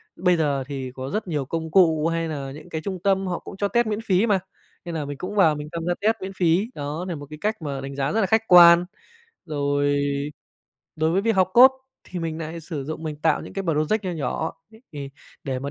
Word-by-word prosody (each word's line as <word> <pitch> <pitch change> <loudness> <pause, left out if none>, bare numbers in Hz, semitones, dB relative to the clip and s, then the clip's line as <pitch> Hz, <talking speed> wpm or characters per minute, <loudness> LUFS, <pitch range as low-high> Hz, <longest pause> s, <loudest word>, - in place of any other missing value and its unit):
bây 180 -1 +2
giờ 140 -4 0
thì 135 -3 -5
có 130 +1 -6
rất 210 +1 -3
nhiều 150 -5 -2
công 160 +2 -4
cụ 160 -4 +4
hay 165 0 -1
là 140 -3 -5
những 155 +5 -11
cái 160 -1 -4
trung 190 +1 -4
tâm 195 -1 +2
họ 175 - -2
cũng 195 - -10
cho 200 - 0
test 235 +1 +1
miễn 215 +1 -2
phí 195 +2 +3
mà, 200 -4 +2 0.5
nên 170 -1 -5
là 150 -2 -2
mình 145 -1 -6
cũng 195 +6 -5
vào 165 -7 +5
mình 150 0 -6
tham 165 -1 -4
gia 175 - +1
test 220 +2 +3
miễn 190 +1 -5
phí, 180 +4 +2
đó 150 +5 -4
nà 175 - -3
một 145 -1 -8
cái 155 - -8
cách 215 -3 -1
mà 140 -3 -4
đánh 135 0 -6
giá 140 0 -1
rất 220 - +1
là - - +3
khách 220 +3 +1
quan. 175 -1 +8 0.6
Rồi 145 -1 0 1.0
đối 160 +1 +1
với 190 +3 +2
việc 225 0 +2
học 185 0 +3
code 260 +2 +8 0.3
thì 180 - -6
mình 165 -1 -3
nại 165 +1 -6
sử 150 -4 -5
dụng 155 +2 -6
mình 155 -2 -4
tạo 160 +2 +1
những - - -10
cái 195 - -3
project 165 +5 0
nho 185 - -1
nhỏ 160 0 -2 0.4
thì 140 -2 -6 0.3
để 130 -2 -2
mà 140 +2 -5
165 Hz, 250 wpm, -24 LUFS, 145-190 Hz, 1.0 s, quan